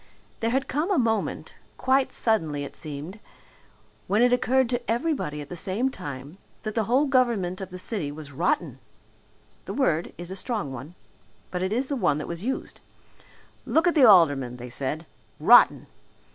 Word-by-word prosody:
There 230 - 0
had 265 +3 0
come 300 +7 -1
a 390 - +2
moment 225 -4 -1 0.2
quite 260 +1 +2
suddenly 160 -11 0
it 140 - -8
seemed 155 +7 -7 0.9
when 210 +5 +3
it 245 0 +4
occurred 260 +1 +2
to 245 -1 0
everybody 235 - -1
at 145 - -10
the 180 - -6
same 205 +9 -1
time 145 - -8 0.2
that 215 -1 -3
the 225 -1 0
whole 255 +7 +3
government 235 -9 +1
of 190 - -6
the 180 - -8
city 180 -6 -4
was 150 -1 -10
rotten. 175 - -1 0.9
The - - -5
word 170 - +1
is 175 +1 -7
a - - -4
strong 195 - -3
one. 135 +7 -9 0.6
But 180 - -3
it 190 +1 -1
is 250 +5 0
the 285 - -2
one 150 - +1
that 150 - -5
was 170 +2 -6
used. 265 +3 -4 0.8
Look 320 - +2
at 345 - +4
the 290 -5 +6
aldermen, 145 -10 +4
they 125 0 -9
said 145 +6 -3 0.3
rotten! - - +6
195 Hz, 175 wpm, -26 LUFS, 150-250 Hz, 0.9 s, the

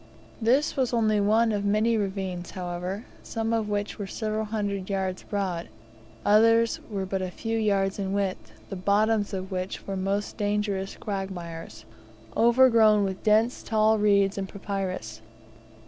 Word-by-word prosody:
This 255 +7 +2
was 255 -3 0
only 215 -2 +2
one 220 +3 +3
of 205 -1 -1
many 215 +3 +2
ravines, 190 -4 -3
however, 180 +4 -5 0.2
some 225 0 -2
of 220 -2 0
which 205 +1 -2
were 200 - -4
several 215 +1 -2
hundred 205 -3 -3
yards 190 -2 -2
broad, 185 -5 -3 0.6
others 230 +2 +4
were 195 -3 -3
but 190 0 -2
a 185 - -2
few 225 +5 -4
yards 200 -3 +1
in 195 -1 -2
width, 195 -2 -2 0.2
the - - -3
bottoms 205 +3 +2
of 190 -1 -5
which 185 0 -4
were 195 - -3
most 195 +2 -2
dangerous 205 -2 -1
quagmires, 175 - -6 0.5
overgrown 230 -3 +5
with 190 -1 -3
dense 220 +3 +3
tall 220 0 +2
reeds 200 -1 +3
and 190 -1 -4
papyrus. 185 - -4
205 Hz, 145 wpm, -26 LUFS, 190-220 Hz, 0.6 s, overgrown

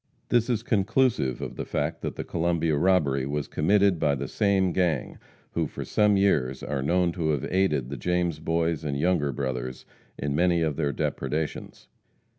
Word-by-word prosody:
This 120 0 +2
is 115 -2 0
conclusive 110 - +1
of - - -6
the - - -2
fact 80 +3 -2
that - - -4
the - - -4
Columbia 85 -2 0
robbery 75 -6 +2
was 75 0 -2
committed 100 +2 +2
by 75 -3 +2
the 70 0 -4
same 95 - +1
gang, 85 -6 -1 0.3
who - - -1
for - - -7
some 105 -1 +3
years 70 -10 +1
are 70 -2 -2
known 85 +5 +2
to 85 -2 -2
have 75 -4 0
aided 95 -9 +1
the 70 - -4
James 85 +2 0
Boys 80 -1 0
and 70 -2 -2
Younger 75 -2 +1
Brothers 65 -1 -4 0.3
in 70 0 -2
many 85 +2 +2
of 75 -3 0
their 75 -2 0
depredations. 75 +3 -3
80 Hz, 175 wpm, -26 LUFS, 70-90 Hz, 0.3 s, some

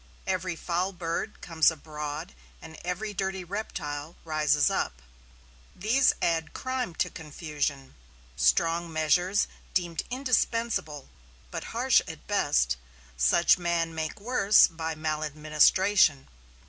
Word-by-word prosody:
Every 185 -2 -1
foul 180 +3 -2
bird 170 +4 -4
comes 165 -2 +3
abroad 150 +1 -6 0.3
and 160 0 -11
every 200 +5 -3
dirty 190 -1 -2
reptile 165 -5 -5
rises 155 -2 +2
up. 60 - -1 0.8
These 240 +7 +3
add 165 -1 0
crime 255 -9 -3
to - - 0
confusion. 150 -3 -4 0.4
Strong 165 - +2
measures 175 +5 +2 0.3
deemed 175 -3 0
indispensable, 235 - -1 0.4
but - - -5
harsh - - +3
at - - -9
best, - - +1 0.4
such 65 - +4
men 170 -1 0
make 160 +6 -4
worse 210 -2 +5
by 160 -1 -4
maladministration. 155 +2 +2
165 Hz, 110 wpm, -28 LUFS, 150-190 Hz, 0.8 s, worse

